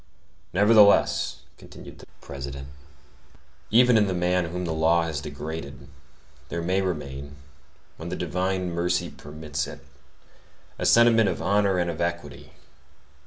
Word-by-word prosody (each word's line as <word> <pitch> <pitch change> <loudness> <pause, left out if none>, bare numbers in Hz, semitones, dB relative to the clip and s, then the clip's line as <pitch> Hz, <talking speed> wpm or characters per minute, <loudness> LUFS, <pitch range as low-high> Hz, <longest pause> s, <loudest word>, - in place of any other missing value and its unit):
"Nevertheless," 105 +1 +4 0.2
continued - - -13
the - - -14
President, 70 -1 -8 1.0
"even 120 +1 +5
in 105 -1 +3
the 95 - -2
man 90 0 +1
whom 90 +2 -4
the 80 - -2
law 80 +2 +2
has 80 -3 -4
degraded, 70 -3 -7 0.6
there 85 0 -4
may 95 +3 +1
remain, 70 -6 -5 0.6
when 80 +2 -7
the 90 - -3
divine 90 +2 -2
mercy 90 +1 -1
permits 75 0 -6
it, 70 - -11 0.9
a - - 0
sentiment 115 -3 +5
of 90 - -3
honor 100 -1 +1
and 85 -1 0
of 80 - -6
equity. 85 0 -4
85 Hz, 130 wpm, -25 LUFS, 80-95 Hz, 1.0 s, even